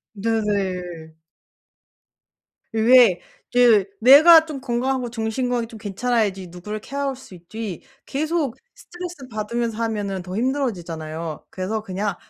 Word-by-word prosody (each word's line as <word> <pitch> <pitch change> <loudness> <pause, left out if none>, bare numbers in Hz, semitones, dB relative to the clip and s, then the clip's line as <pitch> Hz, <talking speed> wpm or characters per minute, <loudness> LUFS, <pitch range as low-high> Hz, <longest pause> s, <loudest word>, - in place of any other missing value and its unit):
네네. 190 -6 -2 1.6
왜 225 -4 +5 0.3
그 235 -5 +5
내가 315 +7 +8
좀 300 -4 -6
건강하고 250 0 -1
정신 225 +2 -2
건강이 240 -2 -1
좀 225 - -11
괜찮아야지 205 -2 -1
누구를 180 +5 -7
케어할 275 +2 -3
수 250 -7 -14
있지 185 +3 -7 0.2
계속 300 -2 -1 0.2
스트레스받으면서 240 -10 -5
하면은 205 -4 -3
더 180 +1 -7
힘들어지잖아요. 170 - -3
그래서 210 +4 -3
그냥 195 0 -3
220 Hz, 280 characters per minute, -22 LUFS, 190-255 Hz, 1.6 s, 내가